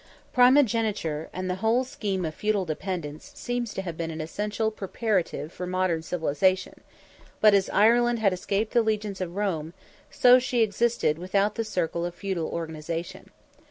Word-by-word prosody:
Primogeniture 225 - +3
and 185 0 -4
the 180 0 -2
whole 230 +3 +3
scheme 200 -7 -3
of 155 - -3
feudal 210 +1 0
dependence 160 -2 -5
seems 245 -2 -3
to 190 - -3
have 170 -3 -5
been 165 -1 -3
an 160 0 -6
essential 210 +7 -2
preparative 195 -6 -2
for 180 - -5
modern 185 -2 0
civilization: 175 +3 0 0.6
but 215 -1 +6
as 195 -1 +3
Ireland 240 +3 +4
had 205 -4 +2
escaped 200 +4 -2
the 240 - +5
legions 210 -3 -2
of 175 -1 -4
Rome, 175 -5 -2 0.3
so 250 0 +6
she 245 -2 +1
existed 220 -7 +1
without 195 +3 +1
the 230 - -2
circle 175 -5 -2
of 175 0 -4
feudal 185 -4 -3
organization. 165 0 -5
190 Hz, 160 wpm, -26 LUFS, 170-220 Hz, 0.6 s, but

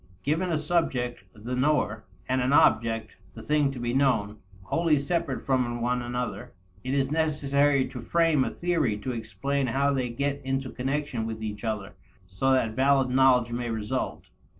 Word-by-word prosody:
Given 165 +5 0
a 160 - +1
subject 140 - -1
the 115 +5 -5
knower 125 -5 +1 0.2
and 130 0 +1
an 130 +3 +1
object 115 -4 +3 0.2
the - - -9
thing 150 -2 +2
to 135 - -6
be 120 0 -2
known 115 -6 +1 0.2
wholly 165 - +2
separate 145 -1 -2
from 125 -3 0
one 125 +1 0
another, 120 -4 -4 0.3
it 130 +2 -1
is 135 0 +1
necessary 145 -3 +2
to 125 -2 -7
frame 165 +2 +2
a - - -1
theory 160 -11 0
to 115 +5 -4
explain 135 +4 -2
how 140 +3 +1
they 130 -2 -1
get 140 +3 -2
into 135 -1 -2
connection 135 -3 -2
with 110 -1 -5
each 105 0 -5
other 110 -4 -3 0.3
so 95 +8 -1
that 130 -4 +2
valid 135 +1 +3
knowledge 125 -2 +4
may 120 0 -3
result. 110 +3 -3
130 Hz, 170 wpm, -27 LUFS, 120-140 Hz, 0.3 s, knowledge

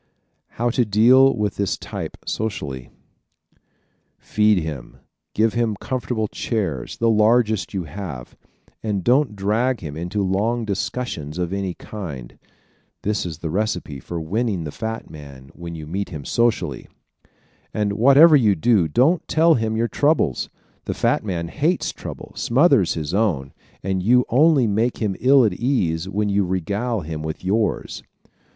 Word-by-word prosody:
How 120 +1 +1
to 125 - +2
Deal 120 +6 +5
with 105 -2 -1
this 100 -1 -1
Type - - -6
Socially 70 - -4 0.7
¶ - - -37 0.6
Feed 105 -1 +2
him, 80 -7 -5 0.4
give 110 +1 +2
him 115 -3 0
comfortable 120 -1 -3
chairs 95 - -3
the 115 - +1
largest 110 -2 +2
you 95 - -1
have 80 -6 -8 0.5
and 105 -4 -2
don't 125 - +2
drag 110 +6 0
him 75 -4 -6
into 90 +5 -2
long 110 +5 0
discussions 100 -6 -4
of 90 0 -2
any 95 -2 -3
kind. 75 - -8 0.6
This 105 -3 -1
is 80 -3 -6
the 80 - -2
recipe 90 -7 -2
for 85 +6 -6
winning 100 +2 -1
the 75 - -5
fat 110 +5 -5
man 70 -4 -12
when 85 -1 -8
you 80 -2 -7
meet 95 +6 -4
him 75 -6 -7
socially. 120 -1 0 0.8
And 105 -1 -1
whatever 140 +9 +7
you 110 -8 +4
do, 95 -1 +3
don't 135 - +2
tell 165 +1 +4
him 110 -4 -1
your 115 +1 +1
troubles! 145 - +1 0.4
The - - -3
fat - - +1
man 85 -5 -3
hates 155 - 0
trouble, - - -9
smothers 130 - +3
his 80 0 -4
own, 85 - 0 0.3
and 95 -1 -1
you 125 +6 +4
only 140 +1 +4
make 110 +3 0
him 105 -4 -1
ill 130 0 +5
at 105 - +1
ease 90 - -1
when 105 +2 -1
you 100 0 +2
regale 100 +5 -2
him 80 -1 -5
with 80 +3 -6
yours. 105 +3 -1
105 Hz, 155 wpm, -22 LUFS, 85-120 Hz, 0.8 s, whatever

